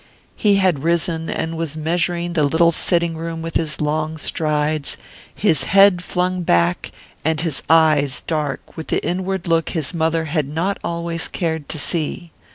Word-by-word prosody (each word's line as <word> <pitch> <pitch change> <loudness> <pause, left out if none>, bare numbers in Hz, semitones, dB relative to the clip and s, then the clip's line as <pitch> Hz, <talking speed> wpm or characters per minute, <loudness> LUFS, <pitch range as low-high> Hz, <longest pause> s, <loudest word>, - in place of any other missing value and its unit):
He 205 -2 +3
had 185 -6 +2
risen 165 -1 0
and 165 0 -2
was 160 -2 -3
measuring 170 +2 -1
the 155 -3 +2
little 160 +4 +4
sitting 170 0 0
room 165 0 -5
with 165 0 -6
his 155 -2 -1
long 155 +1 -1
strides, 150 -1 -1 0.4
his 160 - +2
head 195 -2 +5
flung 180 0 -1
back 85 - +1 0.3
and 160 0 +1
his 165 -5 0
eyes 155 -4 +4
dark 150 -4 -3
with 160 - -7
the - - -1
inward 190 0 -2
look 165 -1 +2
his 160 -1 -1
mother 165 0 0
had 155 -2 -1
not 165 +7 -2
always 170 -1 -2
cared 160 -4 -3
to - - -3
see 165 +2 -3
there. 95 - -35
165 Hz, 165 wpm, -20 LUFS, 155-170 Hz, 0.4 s, head